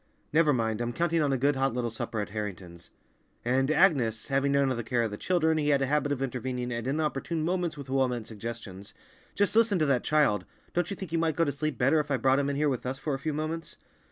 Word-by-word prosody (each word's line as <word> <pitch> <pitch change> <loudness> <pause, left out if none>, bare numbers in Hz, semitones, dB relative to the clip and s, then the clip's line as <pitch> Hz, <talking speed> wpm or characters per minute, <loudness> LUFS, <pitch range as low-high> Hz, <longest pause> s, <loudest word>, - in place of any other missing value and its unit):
"Never 155 -1 +5
mind, 115 -3 0
I'm 120 0 -2
counting 170 +2 +1
on 145 -2 +1
a 135 - +2
good 140 +3 +2
hot 135 -1 0
little 120 -2 -1
supper 110 0 -4
at 105 - -5
Harrington's. 95 -5 -6 0.6
And, 130 +2 +2
Agnes—" 140 - +2
having 135 +1 +2
none 140 -1 +3
of 130 - -1
the 120 - -3
care 120 +1 0
of 110 - -2
the - - -4
children, 160 - +1
he 150 -1 +1
had 140 -1 +3
a - - +2
habit 145 +1 0
of 135 -2 -1
intervening 125 -1 -3
at 120 +1 -4
inopportune 150 +2 -1
moments 175 -2 -1
with 140 -2 -8
well 135 0 +2
meant 120 -3 -4
suggestions—"just 115 - -5
listen 225 -3 +4
to 155 - +2
that 135 -4 +2
child! 140 -11 +2 0.3
Don't 175 -1 0
you 200 - -3
think 190 -4 -7
he 165 - +1
might 165 -2 +1
go 165 - +3
to 145 - 0
sleep 145 -1 -3
better 140 +6 +3
if 150 -1 -2
I 140 - +2
brought 130 +3 +3
him 140 0 0
in 140 - -1
here 150 +1 +1
with 130 -4 -1
us 130 +1 -3
for 150 +1 -3
a 135 - -2
few 155 - -2
moments?" 155 +2 -4
135 Hz, 255 wpm, -28 LUFS, 120-155 Hz, 0.6 s, Never